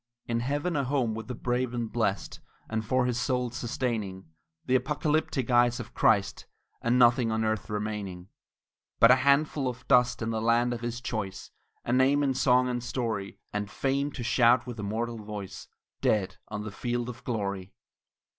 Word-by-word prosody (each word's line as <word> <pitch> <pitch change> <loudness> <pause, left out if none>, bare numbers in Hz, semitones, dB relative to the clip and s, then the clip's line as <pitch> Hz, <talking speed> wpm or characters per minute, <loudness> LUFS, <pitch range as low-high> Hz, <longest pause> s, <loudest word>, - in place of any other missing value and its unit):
In 115 0 -1
Heaven 145 +8 -1
a 140 - +1
home 130 -4 0
with 110 0 -6
the 125 - -4
brave 125 +1 -1
and 115 -2 -3
blessed, 100 -4 -1 0.3
And 110 0 -2
for 130 +3 +1
his 125 0 0
soul's 125 0 -1
sustaining 110 -6 -3 0.4
The 125 - 0
apocalyptic 150 -1 0
eyes 120 0 +4
of 120 - -8
Christ 100 -1 +2 0.3
And 120 +2 +2
nothing 120 -1 +5
on 110 0 0
earth 110 0 -1
remaining, 105 -4 -4 0.7
But 115 - +8
a 125 - +7
handful 140 +1 +2
of 125 0 -6
dust 125 -1 +4
in 110 - -1
the 110 -1 -1
land 120 +2 +2
of 115 - -5
his 120 0 -4
choice, 110 -6 -4 0.3
A 120 - 0
name 135 +3 +4
in 135 -2 +2
song 125 -1 +3
and 120 -1 -2
story 115 -5 -3 0.2
And 105 -1 -2
fame 140 +5 -1
to 125 - -5
shout 120 +1 +4
with 120 -3 -7
immortal 115 +3 -3
voice 105 -2 -7 0.3
Dead 100 -3 +1
on 105 - -5
the 110 - -6
field 120 +3 -2
of 125 +2 -8
Glory! 100 -5 -3
120 Hz, 175 wpm, -28 LUFS, 110-125 Hz, 0.7 s, But